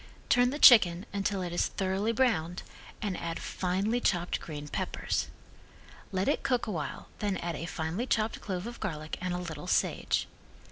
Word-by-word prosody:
Turn 245 -1 +5
the 285 - -3
chicken 200 - +8
until 200 -1 -1
it 175 -1 -4
is 175 - +2
thoroughly 195 +3 -1
browned, 190 -9 +1 0.4
and 200 -3 -1
add 165 -1 -4
finely 195 +6 -1
chopped 175 -5 +1
green 150 -2 -7
peppers. - - -2 0.8
Let 190 0 0
it 290 - +2
cook 250 -2 +1
awhile 155 -10 -4
then 200 -3 0
add 170 -1 -3
a 165 - -5
finely 175 +8 -3
chopped 220 -2 0
clove 185 -2 -3
of 235 0 -7
garlic 155 -7 -4
and 185 0 -2
a 180 - -1
little 170 -2 -6
sage. - - +1
185 Hz, 170 wpm, -30 LUFS, 170-215 Hz, 0.8 s, chicken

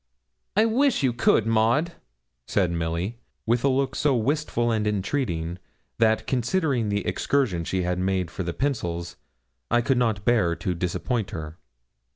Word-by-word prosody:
'I 215 - +6
wish 245 - +2
you 130 -3 +2
could, 115 -2 +3
Maud,' 115 +9 +2 0.6
said 95 -4 +1
Milly, 85 +7 -2 0.3
with 115 +1 +1
a - - +4
look 135 0 +1
so 145 -3 +2
wistful 120 -1 0
and 110 -2 0
entreating, 95 - -2 0.4
that 110 -1 +3
considering 130 - 0
the 100 -1 -1
excursion 115 -12 0
she 95 +2 -1
had 90 0 -1
made 95 -2 0
for - - -5
the 85 -1 -2
pencils, 85 -9 -2 0.5
I 120 0 +3
could 130 +1 +1
not 110 -5 0
bear 105 -9 +3
to 90 - -2
disappoint 95 +5 -2
her. 80 0 -7
110 Hz, 155 wpm, -25 LUFS, 90-130 Hz, 0.6 s, I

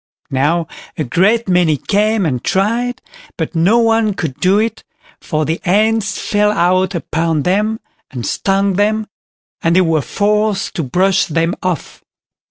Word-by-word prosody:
Now 150 +6 +1 0.3
a 155 - -1
great 200 - +1
many 175 -5 +2
came 210 +3 +1
and 125 -6 -2
tried, 230 +6 -1 0.3
but - - -3
no 180 +7 +3
one 225 -3 +2
could 155 -8 -4
do 190 +2 +3
it, 225 +1 -1 0.4
for 155 -2 -2
the 160 +3 -2
ants 215 +2 +1
fell 210 0 +1
out 185 0 +1
upon 160 -2 -1
them 210 +6 0 0.3
and 125 -4 -6
stung 195 -1 0
them, 215 +1 +1 0.6
and 165 +1 +2
they 185 - +5
were 165 -3 +1
forced 210 +4 0
to - - 0
brush 185 +9 +1
them 165 +1 0
off. 185 -3 -4
190 Hz, 150 wpm, -16 LUFS, 165-210 Hz, 0.6 s, they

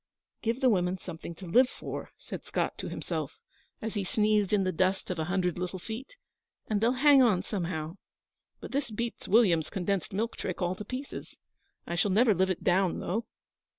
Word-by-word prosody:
'Give 235 +3 -1
the 260 - +5
women 180 -2 +1
something 170 -2 -8
to 185 - -9
live 250 +9 +5
for,' - - -6
said - - -7
Scott - - -1
to - - -4
himself, - - -4 0.5
as 225 - -2
he 205 -3 -1
sneezed 210 0 +2
in 205 -2 +3
the 185 - +1
dust 185 +2 0
of 175 - -3
a 160 - 0
hundred 180 -1 0
little 180 +1 -3
feet, 225 - -7 0.5
'and 210 -2 0
they'll 235 +2 +4
hang 280 +1 +6
on 205 -7 +4
somehow. 170 -4 -3 0.6
But - - -8
this 275 -2 -1
beats 235 +2 -4
William's 185 -7 +4
condensed 190 0 -1
milk 220 +4 -2
trick 185 - -3
all 180 0 +1
to 190 - -7
pieces. 255 +6 -7 0.5
I - - -4
shall 180 +4 +2
never 215 +3 +5
live 190 +1 +2
it 185 - -2
down, 185 0 +3
though.' 220 +6 -2
195 Hz, 190 wpm, -29 LUFS, 180-225 Hz, 0.6 s, hang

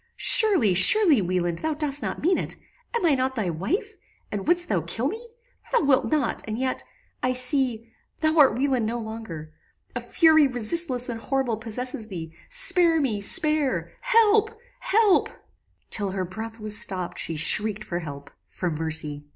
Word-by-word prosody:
"Surely, 380 - +7
surely 295 - +7
Wieland, 175 -2 -3
thou 315 -1 -4
dost 290 -2 0
not - - -6
mean 360 +3 +1
it. - - -5 0.4
Am 470 - -2
I 320 - +2
not 260 0 -2
thy 205 -7 -3
wife? 385 - -5 0.3
and 205 +3 -6
wouldst 350 +1 +2
thou 190 -6 -1
kill 195 - -4
me? 460 +3 -11 0.4
Thou - - +1
wilt 275 -2 +2
not; 295 -6 -2
and 215 0 -5
yet 255 +1 -4 0.4
I 255 - -1
see 250 -3 0 0.3
thou 315 0 0
art 270 -4 +4
Wieland 260 -4 -1
no 235 +2 -4
longer! 220 -9 -9 0.4
A - - -4
fury 315 -3 +2
resistless 250 +1 0
and 230 -2 -7
horrible 265 -5 -3
possesses 230 +1 -3
thee 165 -5 -9 0.2
Spare 360 -9 +2
me 230 -8 -3
spare 305 - -1
help 445 -3 +2 0.3
help 425 -4 +1 0.3
" - - -46
"Till 200 -2 -2
her 190 -1 -4
breath 220 +5 -9
was 215 -1 -3
stopped 190 -6 +1
she 165 - -2
shrieked 210 +7 +2
for 175 -3 -6
help 145 -4 -10 0.2
for 180 -2 -5
mercy. 155 -2 -4
245 Hz, 165 wpm, -23 LUFS, 195-310 Hz, 0.4 s, Surely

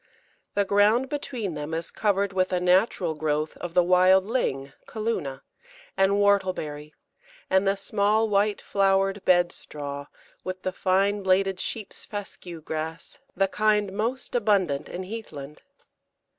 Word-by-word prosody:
The 200 0 +2
ground 210 +6 +3
between 250 - -4
them 150 +1 -4
is 165 0 -3
covered 200 -2 0
with 185 -1 +1
a 180 - +1
natural 180 -1 +2
growth 155 0 -1
of 175 -1 -7
the 180 - +6
wild 185 +1 +5
Ling 140 - -2
(Calluna) 200 -12 -3 0.5
and 195 +1 +3
Whortleberry, 185 -7 0 0.6
and 190 +1 +3
the 195 +1 +2
small, 210 +2 +1
white 205 0 +1
flowered 195 0 +1
Bed 175 -1 +4
straw, 140 -1 -7 0.4
with 185 0 -5
the 185 - -1
fine 195 +2 +1
bladed 190 0 +2
Sheep's 215 0 -3
fescue 185 -5 -7
grass, 160 +1 -6 0.2
the 195 +1 +2
kind 210 -1 +1
most 230 +6 -3
abundant 200 - +1
in 185 - -5
heathland. 155 -9 -8
190 Hz, 135 wpm, -26 LUFS, 170-205 Hz, 0.6 s, the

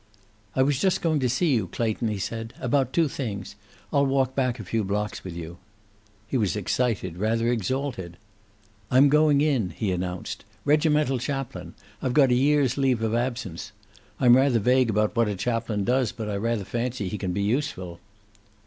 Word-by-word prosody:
"I 130 - +4
was 140 -1 +1
just 190 +2 +1
going 160 -3 +2
to 130 -2 +1
see 140 +5 +2
you, 110 -7 +1
Clayton," 115 +4 -1
he 105 -2 -2
said. 115 +4 -5
"About 130 0 +1
two 165 +2 +2
things. 110 -9 -5 0.4
I'll 140 -1 +3
walk 135 -1 +1
back 125 -2 0
a - - -5
few 110 +4 -1
blocks 105 +2 -3
with 90 -3 -7
you." 85 +1 -8 0.7
He 130 - -1
was 105 -5 0
excited, 105 -3 -1
rather 115 +4 +1
exalted. 120 -6 -2 0.7
"I'm 135 +3 +6
going 150 -1 +4
in," 135 -11 +1
he 95 +4 -2
announced. 90 0 -4 0.2
"Regimental 150 -3 +2
chaplain. 120 - -5 0.3
I've 130 -2 -1
got 135 -4 +5
a - - +5
year's 140 0 +2
leave 130 -4 +2
of 110 0 0
absence. 120 -8 -3 0.5
I'm 120 -1 +7
rather 130 -2 +4
vague 125 +2 +3
about 105 +1 +1
what 115 -1 +3
a 105 - -2
chaplain 115 0 -1
does, 125 0 +1
but 110 -2 -6
I 105 - -2
rather 110 0 -1
fancy 120 -2 -3
he 105 +3 -4
can 95 -3 -2
be 100 +2 -1
useful." 100 - -2
120 Hz, 180 wpm, -25 LUFS, 105-135 Hz, 0.7 s, I'm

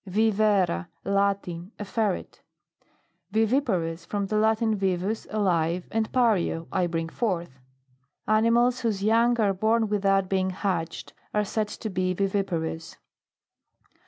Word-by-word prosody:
VIVERRA. 200 - +2 0.2
Latin. 200 -2 -1
A 210 - -5
ferret. 210 -2 -2 0.9
VIVIPAROUS. 215 - +1
From 205 -1 -2
the 215 - -3
Latin, 220 +1 +2
vivus, 195 +2 -1
alive, 180 -4 0
and^ario, 220 -7 +1
I 185 -2 +1
bring 165 -1 -2
forth. 170 - -3 0.7
Ani 215 +2 +3
mals 240 +2 +3
whose 215 -5 -1
young 230 +3 +3
are 205 -3 +3
born 220 +3 +1
with 205 -1 -1
out 195 -1 +3
being 190 0 0
hatched, 180 -4 -3 0.2
are 210 0 +2
said 215 +1 -1
to 215 +1 -6
be 185 -1 0
viviparous. 175 -5 -2
200 Hz, 125 wpm, -26 LUFS, 180-220 Hz, 0.9 s, Ani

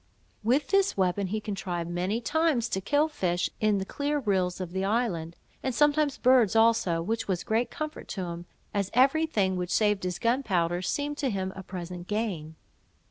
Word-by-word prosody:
With 265 +6 +2
this 395 - +2
weapon 190 +1 +1
he 215 +4 -2
contrived, 190 -5 -4
many 180 +6 -1
times, 310 -4 +1
to 190 - -1
kill 290 +9 +2
fish 180 - -1
in 215 -1 +2
the 190 - -2
clear 290 +7 -1
rills 190 -8 0
of 180 -2 -5
the 190 +1 -2
island, 195 -6 -1 0.3
and 260 -2 -2
sometimes 295 0 +3
birds 250 -4 +4
also, 225 -7 +3
which 225 +4 -2
was 185 -3 -1
a - - -31
great 225 +3 +1
comfort 310 0 -6
to - - -1
him, 170 0 -6 0.3
as 200 -2 0
every 275 +6 +4
thing 190 -10 +1
which 180 -1 -3
saved 210 -2 +2
his 180 -1 -2
gunpowder 185 -9 +1
seemed 290 +10 -2
to 275 - +1
him 190 -3 -2
a 190 - -6
present 180 -1 -7
gain. 190 -8 -3
205 Hz, 190 wpm, -28 LUFS, 180-255 Hz, 0.3 s, birds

